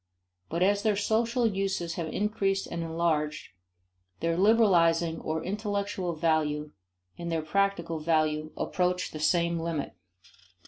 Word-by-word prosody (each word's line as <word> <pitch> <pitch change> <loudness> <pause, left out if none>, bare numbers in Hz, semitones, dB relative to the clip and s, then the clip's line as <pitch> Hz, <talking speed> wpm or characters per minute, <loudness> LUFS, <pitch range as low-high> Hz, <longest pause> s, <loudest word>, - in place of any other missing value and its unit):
But 170 +2 0
as 200 +1 +3
their 215 -1 +2
social 230 +4 +1
uses 195 -5 -1
have 170 -2 -3
increased 195 +1 0
and 170 - -5
enlarged, 160 -2 -1 0.7
their 165 0 0
liberalizing 170 -5 +4
or 160 0 -2
"intellectual" 200 -3 -2
value 155 -2 0 0.5
and 170 0 -4
their 160 -1 -1
practical 170 -2 0
value 155 -1 +1
approach 180 0 -1
the 155 - -7
same 170 +2 +2
limit. 165 -3 -3
170 Hz, 125 wpm, -28 LUFS, 160-200 Hz, 0.7 s, liberalizing